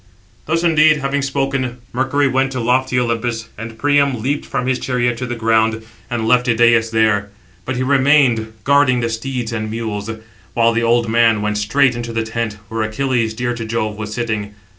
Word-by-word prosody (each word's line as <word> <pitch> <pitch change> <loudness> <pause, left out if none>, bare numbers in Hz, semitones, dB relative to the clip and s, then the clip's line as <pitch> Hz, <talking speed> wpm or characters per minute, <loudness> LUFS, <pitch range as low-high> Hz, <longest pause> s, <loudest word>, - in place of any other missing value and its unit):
Thus, 165 +2 0
indeed, 155 -2 +4
having 140 0 -1
spoken, 135 -2 -2 0.2
Mercury 135 +3 +1
went 135 0 +1
to 130 - -3
lofty 125 +1 +1
Olympus; 115 -1 -2
and 115 +1 -8
Priam 140 -1 +2
leaped 140 +6 -2
from 125 - -2
his 130 0 0
chariot 120 -2 0
to 125 - -3
the 120 - -3
ground, 110 -1 +1 0.3
and 115 -2 -2
left 125 +1 +3
Idæus 115 -1 +3
there: 110 -2 +1 0.4
but 130 - -3
he 125 - -1
remained, 130 -4 +3
guarding 140 -2 +3
the 115 - -1
steeds 120 0 -4
and 110 -1 -3
mules; 110 -2 -4 0.5
while 115 0 +3
the 115 - 0
old 120 0 +2
man 115 -2 +3
went 105 0 -1
straight 125 +5 +2
into 120 0 -5
the 115 0 -1
tent, 110 -1 -4
where 115 0 -3
Achilles, 115 0 -1
dear 120 +1 -2
to 115 -1 -5
Jove, 110 -1 -2
was 105 0 -6
sitting. 105 -3 -3
120 Hz, 185 wpm, -18 LUFS, 110-130 Hz, 0.5 s, indeed